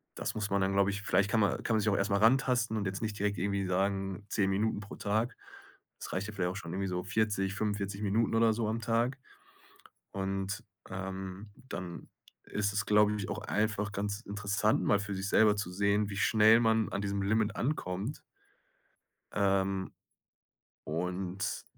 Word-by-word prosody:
das - - -3
muss 105 -2 -2
man 100 0 +1
dann, 95 +1 +1
glaube 100 0 +3
ich 100 0 -4
vielleicht 100 +1 +2
kann 115 - +3
ma 100 - +2
kann 115 - -1
man - - +3
sich 105 - +2
auch 100 - +2
erst 100 +2 0
mal 100 - +4
rantasten 120 0 +3
und 105 - -1
jetzt 95 0 -3
nicht 110 -2 -3
direkt 100 0 0
irgendwie 100 +1 0
sagen: 95 +1 -1
„10 100 -2 +1
Minuten 105 +2 0
pro 100 - -9
Tag.“ 110 +4 -1 0.6
Es - - -7
reicht 95 +2 -2
ja 105 - -7
vielleicht 90 -3 -1
auch 95 - -7
schon 85 -3 -6
irgendwie 95 +1 -1
so 90 0 -2
40, 95 -1 0
45 100 -1 -2
Minuten 105 +2 +1
oder 115 0 +4
so 110 0 -1
am 115 +2 -1
Tag. 120 +4 +1 1.0
Und, 95 +2 -3 0.3
ähm, 95 +1 -6
dann 90 -9 -7 0.4
ist 105 0 -1
es, 100 -2 -1
glaube 105 0 +4
ich, 100 - -4
auch - - -3
einfach 105 -1 -1
ganz 100 +1 -2
interessant, 105 0 0
mal 105 - +4
für 100 0 -4
sich 95 +1 -3
selber 105 0 +5
zu 100 -3 -3
sehen, 100 +2 +2
wie 95 - -5
schnell 110 +2 +5
man 110 -2 +3
an 100 - -2
diesem 100 0 -1
Limit 105 +1 +1
ankommt 115 - -2 1.1
ähm, 95 -1 +1 0.9
und 90 +3 -3
100 Hz, 185 wpm, -31 LUFS, 95-110 Hz, 1.1 s, selber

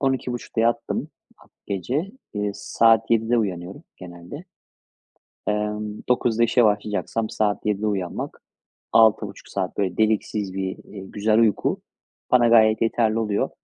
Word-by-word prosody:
00.30'da 125 -4 -1
yattım 115 +1 0 0.3
ha - - -21 0.2
gece, 125 - -2 0.3
ııı, 105 0 0
saat 115 +1 +3
07.00'da 115 +1 +2
uyanıyorum 95 -3 -4
genelde, 90 - -10 1.0
ımm, 105 0 -2
09.00'da 120 -2 +2
işe 120 +1 +3
başlayacaksam 105 +1 0
saat 105 -1 -1
07.00'da 105 0 0
uyanmak, 95 -4 -3 0.5
6,5 110 -3 +3
saat, 95 -2 -3
böyle, 95 -3 -1
deliksiz 105 -2 0
bir, 95 -1 -3
iii, 95 -2 -10
güzel 110 +1 +1
uyku 110 -3 +2 0.5
bana 120 -2 +5
gayet 110 -1 +5
yeterli 115 -1 +1
oluyor. 105 -2 0
110 Hz, 125 wpm, -23 LUFS, 100-115 Hz, 1.0 s, bana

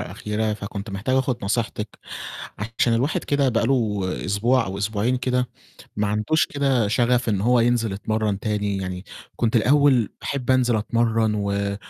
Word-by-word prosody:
الأخيرة، 105 +1 -2
فكنت 100 0 -6
محتاج 100 +7 -1
آخُد 130 -2 +1
نصيحتِك، 105 0 -2 0.8
عشان 115 - +3
الواحد 130 +7 0
كده 140 -1 +2
بقى 115 -2 +1
له 115 -6 +1 0.3
أسبوع 115 +6 +2
أو 95 +1 -5
أسبوعين 110 +4 0
كده 125 0 0 0.5
ما 105 0 +1
عندهوش 110 +10 +1
كده 135 -6 +1
شَغَف 120 +2 +2
إن 100 -3 +1
هو 120 +3 +3
ينزل 115 -2 +2
يتمرَّن 105 0 -1
تاني، 105 -2 -1
يعني 90 -1 -4 0.3
كنت 115 0 +1
الأول 130 -1 +4
باحب 135 -2 -3
أنزل 125 -3 +3
أتمرَّن 115 0 +1
و 100 -1 -1
115 Hz, 150 wpm, -23 LUFS, 105-125 Hz, 0.8 s, الأول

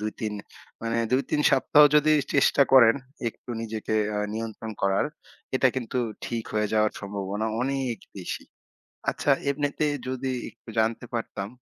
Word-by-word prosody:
২-৩ 110 0 -3 0.5
মানে 115 0 -1 0.2
২-৩ 140 +3 +1
সপ্তাহও 145 +2 +6
যদি 155 +1 +5 0.2
চেষ্টা 140 0 +5
করেন 115 -4 +8 0.3
একটু 120 - -12
নিজেকে 110 -1 -3 0.2
আ - - 0 0.2
নিয়ন্ত্রণ 110 0 -5
করার 100 +7 +2 0.5
এটা 130 - +4
কিন্তু 125 0 -2 0.3
ঠিক 115 -2 -3
হয়ে 105 -1 +1
যাওয়ার 110 0 +3
সম্ভাবনা 100 +1 -3 0.2
অনেক 135 -3 -1 0.2
বেশি। - - -5 0.7
আচ্ছা, 145 - +1 0.2
এমনিতে 145 +2 0 0.2
যদি 130 0 -2 0.2
একটু - - -17
জানতে 115 +2 0
পারতাম, 110 -4 -3
115 Hz, 135 wpm, -26 LUFS, 110-135 Hz, 0.7 s, করেন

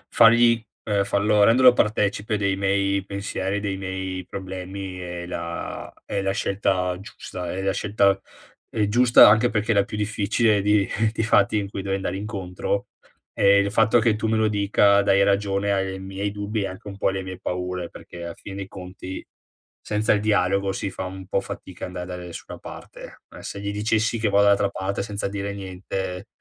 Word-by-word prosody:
fargli 115 0 +6 0.2
ehm, 100 -2 +1
farlo 105 +1 +3
renderlo 125 +3 +7
partecipe 105 -1 0
dei 100 -1 +1
miei 100 0 +1
pensieri, 100 0 -3
dei 100 -2 -3
miei 95 -1 -4
problemi 95 0 -6
è 90 -1 -6
la 85 -1 -5
è 100 - -2
la 95 0 0
scelta 95 -2 0
giusta, 90 -4 -7
è 95 +1 -4
la 95 0 +1
scelta 100 -2 +2 0.5
ehm, 105 -3 0
giusta, 120 +2 +7
anche 110 +4 +5
perché 110 0 0
la 100 -1 +4
più 105 - -6
difficile, 105 0 +1
di 105 -1 +3 0.2
di 110 - -2
fatti 105 -1 +3
in 100 -1 -1
cui 100 -1 -5
devo 95 0 -1
andare 95 -1 -3
incontro, 100 -1 -3 0.4
e 100 0 +5
il 100 0 +2
fatto 110 +2 +4
che 115 -2 +3
tu 110 - -2
me 110 0 +1
lo 110 -1 +2
dica, 100 0 +3
dai 100 0 +4
ragione 100 0 +1
ai 95 -1 -1
miei 95 +1 -4
dubbi, 105 +1 -3
e 100 - -1
anche 100 +3 -10
un 100 - -9
po' - - 0
alle 95 0 -1
mie 95 -1 -7
paure, 90 -1 -3
perché 85 0 -11
alla 85 -1 -6
fine 100 -1 -9
dei 95 -1 -5
conti, 95 0 -8 0.6
senza 105 +1 +1
il 105 - 0
dialogo 100 -2 +1
si 95 0 -3
fa 95 - -5
un 95 0 -7
po' 100 - +1
fatica 90 -1 -8
andare 90 -1 -6
da 90 0 -6
nessuna 90 -1 -9
parte. - - -11
Eh, - - -10
se 100 - -6
gli 100 0 -3
dicessi 110 +2 0
che 110 -2 +1
vado 100 +1 +4
dall'altra 100 -1 +4
parte, 100 0 -3
senza 100 0 -3
dire 100 0 -4
niente, 95 0 -5
100 Hz, 190 wpm, -24 LUFS, 95-105 Hz, 0.6 s, renderlo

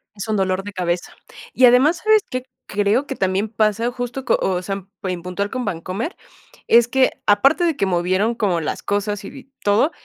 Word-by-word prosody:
Es 200 +1 -6
un 215 - 0
dolor 190 0 0
de 205 0 -8
cabeza, 175 -1 -2 0.4
y 255 - +5
además, 260 +7 +5
¿sabes 435 -1 +5
qué?, 255 0 -3 0.2
creo 205 +7 +1
que 270 - -4
también 195 +3 0
pasa 220 +2 +1
justo 245 +1 -5
co - - +2
o 185 -1 0
sea, 195 +2 -3
en 195 -1 -9 0.2
en 180 -1 -3
puntual 180 +3 -3
con 255 -1 -3
Bancomer, 185 - -4 0.5
es 235 0 +6
que, 260 +1 +3 0.2
aparte 275 - +4
de 330 -3 +1
que 200 - 0
movieron 185 +5 +1
como 190 -7 0
las - - -3
cosas 205 +1 -2
y - - -6
bi 275 0 -13
todo, 210 +10 +3
205 Hz, 205 wpm, -20 LUFS, 190-250 Hz, 0.5 s, es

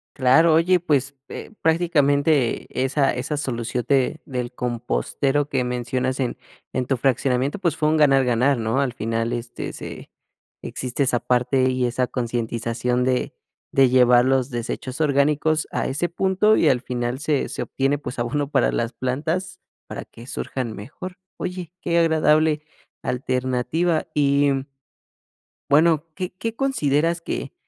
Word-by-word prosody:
Claro, 150 +5 +5
oye, 175 +3 +4
pues, 140 -5 0
eh, - - -8
prácticamente 150 -5 +2 0.2
esa 135 +1 +2
esa 130 +4 -3
solución 120 -3 -2
de 140 +2 +2
del 125 -3 -4
compostero 125 +4 -1
que 130 -2 0
mencionas 125 +2 -2
en 125 -3 -1 0.4
en 130 -1 -1
tu 135 - +1
fraccionamiento, 130 - 0
pues, 170 -5 0
fue 150 - +1
un 155 - +2
ganar, 135 -3 +4
ganar, 125 +3 +2
¿no? 115 +4 0
Al 130 -3 -1
final, 115 0 -2
este, 120 0 -5
se - - -9 0.5
existe 130 +2 -2
esa 125 -2 +2
parte, 125 +2 +2
y 130 -1 0
esa 125 +1 0
concientización 120 0 -1
de 125 0 0 0.4
de 135 -1 +5
llevar 125 -1 +5
los 130 0 +2
desechos 125 +3 -5
orgánicos 150 +1 +2
a - - -1
ese 150 +6 -1
punto. 190 +5 +2
Y - - +4
al 125 -2 +2
final 125 0 -3
se 150 -1 0
se - - -5
obtiene, 135 +2 0
pues, 125 - -6
abono 140 +4 -1
para 135 -4 +2
las 115 +2 -2
plantas, 160 +8 -2 0.3
para - - -7
que 115 - -14
surjan 125 -4 -4
mejor. 170 - -8 0.2
Oye, 180 -2 -5
qué 170 -1 +1
agradable 155 -1 +3 0.4
alternativa. 130 +6 0
Y 140 -1 +3 1.2
bueno, 155 +1 +4
¿qué 185 -1 -4
qué 225 0 -3
consideras 165 - +1
que 140 -4 -4
135 Hz, 145 wpm, -23 LUFS, 125-155 Hz, 1.2 s, Claro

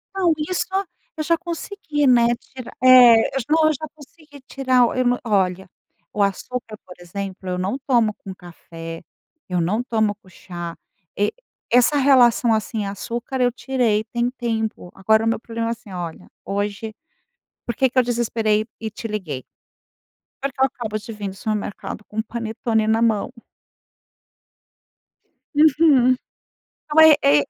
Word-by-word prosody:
Não, 360 -4 +3
isso 325 +4 -2 0.5
eu 310 - -2
já 335 +2 +2
consegui, 335 -3 -3
né, 240 -1 +4
tirar, 255 -3 -11
eh, 245 -3 +8
eu 270 - 0
não 315 0 +4
eu 310 - +2
já 310 +2 -6
consegui 295 -1 -16
tirar, 255 -3 +2
eu 255 - +1
não 245 0 +2
olha, 190 -4 0 0.4
o 210 - -1
açúcar, 215 +3 -2
por 180 - -12
exemplo, 190 +1 -6
eu 180 - -2
não 190 +7 -2
tomo 235 -5 +3
com 195 -2 -10
café, 165 -2 -10 0.5
eu 180 - 0
não 200 +8 0
tomo 220 -4 0
com 195 -2 -22
chá, 175 -2 -8 0.4
e 205 +1 +1 0.4
essa 250 +4 +4
relação, 250 -4 +4
assim, 215 0 -2
açúcar, 235 +6 -4
eu 245 0 +3
tirei, 240 -4 0
tem 240 0 +1
tempo. 225 -6 -4
Agora 220 +3 +2
o - - +1
meu 225 - +1
problema 230 0 -4
é - - 0
assim 220 -3 -8
olha, 175 -3 -6 0.2
hoje, 205 +2 -3 0.7
por 235 - -3
que 265 +3 +2
que 255 +1 +2
eu - - +4
desesperei 225 -3 0
e 220 - -4
te 220 +2 -7
liguei, 185 -12 -5 1.0
por 275 0 -2
que 260 - -12
eu - - +6
acabo 225 -4 -5
de 225 +2 -9
vir 205 -2 -5
do 190 - -7
supermercado 210 -1 -4
com 215 - -10
o 220 - +1
panetone 225 -1 -2
na 225 +1 +2
mão. 220 -3 +1 2.3
Uhum, 295 -4 +5 0.7
então 305 +1 +4 0.2
é 145 +1 +5
é, - - -2
225 Hz, 160 wpm, -21 LUFS, 205-255 Hz, 2.3 s, eh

